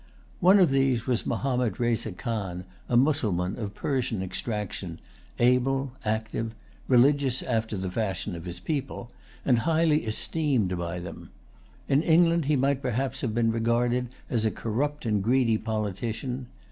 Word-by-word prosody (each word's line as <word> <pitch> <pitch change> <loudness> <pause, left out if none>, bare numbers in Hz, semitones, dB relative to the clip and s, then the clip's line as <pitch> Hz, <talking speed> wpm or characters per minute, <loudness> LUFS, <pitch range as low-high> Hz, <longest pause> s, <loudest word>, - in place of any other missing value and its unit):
One 185 +3 +6
of 180 -7 +5
these 135 -4 +2
was 125 -3 0
Mahommed 125 -6 0
Reza 120 -2 0
Khan, 95 -5 -4 0.2
a 120 - +3
Mussulman 110 - +1
of 105 -3 -5
Persian 120 -8 -1
extraction, 95 -3 -4 0.4
able, 125 +2 +2
active, 110 +1 -2 0.3
religious 135 0 +4
after 110 -3 -1
the 95 -1 -3
fashion 100 -2 -2
of 85 0 -8
his 90 -1 -6
people, 135 - -4 0.3
and 125 -4 +4
highly 160 +2 +2
esteemed 110 - +1
by 85 0 -3
them. 85 0 -8 0.6
In 140 +1 +3
England 170 -1 +4
he 150 +1 +2
might 140 0 +1
perhaps 130 +1 -2
have 110 -4 -2
been 115 -1 +2
regarded 120 +2 +1 0.2
as 115 -3 0
a 110 - +3
corrupt 135 +8 -2
and 105 -3 +1
greedy 115 -1 +3
politician. 115 +4 -3
120 Hz, 145 wpm, -27 LUFS, 110-135 Hz, 0.6 s, One